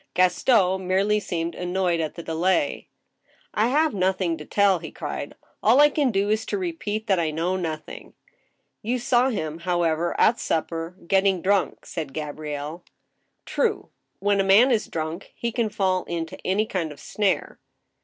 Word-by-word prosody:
Gaston 190 0 +3
merely 200 +3 +2
seemed 170 -4 -3
annoyed 180 -1 0
at 155 -2 -3
the 170 - -7
delay. 165 -2 0 0.3
" - - -51 0.3
I 215 +2 +2
have 305 +5 +2
nothing 185 -3 +1
to 150 - -8
tell," 200 -1 +3
he 160 - -7
cried. - - -6
" - - -39
All 235 +5 +5
I 295 0 +8
can 285 -3 +2
do 200 -1 +1
is 220 +1 +1
to - - -1
repeat 325 - -3
that 195 -5 +2
I 165 -2 +1
know 165 +4 -1
nothing." 165 -4 -6 0.3
" - - -48 0.3
You 240 +3 -1
saw 245 +1 +2
him, 160 -9 -3
however, 170 -1 0
at 235 - +4
supper 165 +1 -2
— - - -18
getting 195 -1 +3
drunk," 195 0 +1
said 150 -6 -6
Ga 150 -1 -3
brielle. 150 +2 -6 0.6
"True; 440 -3 -1 0.3
when 200 0 +1
a - - +4
man 205 +7 +6
is 225 -3 +1
drunk, 160 +2 -5
he 235 - -2
can 230 -2 0
fall 190 -3 0
into 165 -1 -4
any 200 +4 +1
kind 175 -7 -3
of 145 - -12
snare." 205 -3 -1
185 Hz, 180 wpm, -24 LUFS, 165-215 Hz, 0.6 s, I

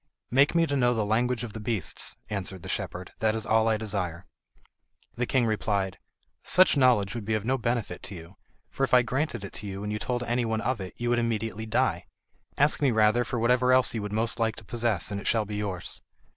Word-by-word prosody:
"Make 140 +6 +4
me 170 0 +4
to 145 -3 -2
know 120 -2 +3
the 110 -2 0
language 120 +3 0
of 115 -3 -6
beasts," 105 -5 -1
answered 95 -3 -4
the - - -7
shepherd, 90 +1 -4
"that 110 0 +1
is 110 -1 -2
all 110 0 +3
I 110 -1 +2
desire." 95 -5 -3 0.9
The 125 0 -2
king 130 -3 +2
replied: 100 -3 -1 0.4
"Such 185 -2 +5
knowledge 120 -7 +3
would 120 -2 -5
be 110 +1 0
of 110 -1 -3
no 130 +3 +2
benefit 120 -1 -2
to 100 - -6
you, 85 +2 -11 0.4
for 135 - -3
if 130 - +3
I 125 - +6
granted 125 -2 -2
it 100 - -8
to 105 - -6
you 100 +1 -5
and 105 0 -3
you 105 - -2
told 120 +3 -2
any 120 +1 0
one 110 -1 -1
of 125 -3 -1
it, 95 - -7
you 120 0 -1
would 120 - +3
immediately 110 -1 -2
die; 110 - 0 0.5
ask 145 +2 +3
me 140 - +4
rather 110 +1 +3
for 120 0 -4
whatever 125 +2 +3
else 130 -2 +4
you 110 - -2
would 105 0 -5
most 115 +2 0
like 110 -1 +1
to 110 - -12
possess, 115 -5 -1
and 100 0 -3
it - - -6
shall 110 -2 +2
be 105 0 -5
yours." 95 -4 -4
110 Hz, 230 wpm, -27 LUFS, 105-120 Hz, 0.9 s, I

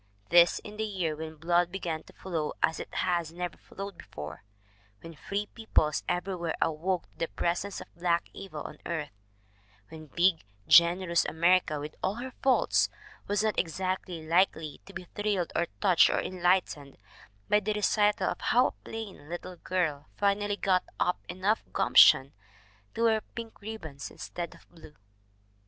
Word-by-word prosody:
This 175 0 +6
in 210 0 -9
the 220 - -1
year 185 -7 -2
when 160 +1 -7
blood 175 +2 +1
began 170 -5 -3
to - - -16
flow 165 -5 -3
as 160 - +2
it - - -7
has 170 -3 0
never 175 0 -4
flowed 195 -2 -8
before; 75 +4 -8 0.6
when 165 - -9
free 200 +7 -3
peoples 205 -9 0
everywhere 175 -2 -2
awoke 170 +3 0
to - - -30
the 165 - 0
presence 180 +5 -2
of - - -13
Black 170 0 +1
Evil 155 -6 -7
on 150 - -9
earth; 160 -3 -3 0.8
when 155 -1 -10
big, 175 +2 +2 0.2
generous 170 0 +5
America 170 -2 +2
with 150 +1 -6
all 190 +2 0
her 255 +2 -6
faults 265 -1 +3 0.4
was 205 +1 +1
not 215 -2 +1
exactly 180 -1 -2
likely 165 -3 +1
to 195 - -12
be - - -6
thrilled 205 -4 -1
or 170 - +1
touched 185 -4 +6
or - - +1
enlightened 175 -6 0 0.5
by 210 - +4
the 210 +1 -1
recital 210 0 +2
of - - -7
how 250 +2 +4
a - - -19
plain 210 -9 -8
little 175 +1 -6
girl 155 -7 -1
finally 205 0 +1
got 185 -2 +2 0.2
up 180 - +1
enough 190 +5 0
gumption 135 +1 +6 0.6
to 230 - 0
wear 220 -1 +3
pink 230 -2 -8
ribbons 160 - -7
instead 175 -1 -6
of - - -20
blue. 160 -3 -15
175 Hz, 160 wpm, -29 LUFS, 160-200 Hz, 0.8 s, This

